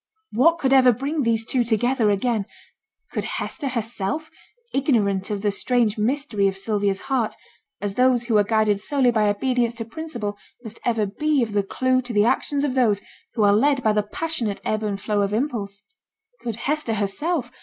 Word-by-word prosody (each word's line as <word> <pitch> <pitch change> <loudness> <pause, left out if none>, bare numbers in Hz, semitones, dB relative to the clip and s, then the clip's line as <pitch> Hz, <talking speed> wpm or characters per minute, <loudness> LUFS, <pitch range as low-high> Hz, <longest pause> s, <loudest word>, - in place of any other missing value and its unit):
What 330 +8 +4
could 270 -5 +1
ever 255 -2 +7
bring 280 +6 -2
these 225 -2 +1
two 250 +1 +1
together 235 0 +1
again? 205 0 0 0.6
Could - - -2
Hester 290 - -4
herself 240 +4 -3 0.4
ignorant 210 -9 +1
of 205 -1 -3
the 205 - +2
strange 230 +1 +1
mystery 225 -2 0
of 195 0 -2
Sylvia's 200 -1 -1
heart, 255 -5 -1 0.4
as 205 -1 -3
those 250 +1 +3
who 230 -2 0
are - - +4
guided 215 -1 +2
solely 260 +3 +2
by 215 -2 +2
obedience 240 +2 0
to 230 -1 -4
principle 230 -7 -5 0.2
must 225 -1 -9
ever 230 -3 +1
be 290 +7 +1
of 220 - -4
the 205 - +3
clue 255 +6 +1
to 245 -1 -7
the 205 0 +4
actions 280 +4 +1
of 285 -3 0
those 225 -6 +2 0.3
who 220 - +2
are 200 0 +5
led 275 +4 +3
by 215 - +3
the 210 - +2
passionate 230 -1 -3
ebb 215 0 0
and 205 -2 -2
flow 205 0 0
of 200 0 0
impulse? 215 -5 -2 0.6
Could 230 -3 -3
Hester 270 0 -1
herself? 240 - -1
230 Hz, 185 wpm, -23 LUFS, 205-260 Hz, 0.6 s, ever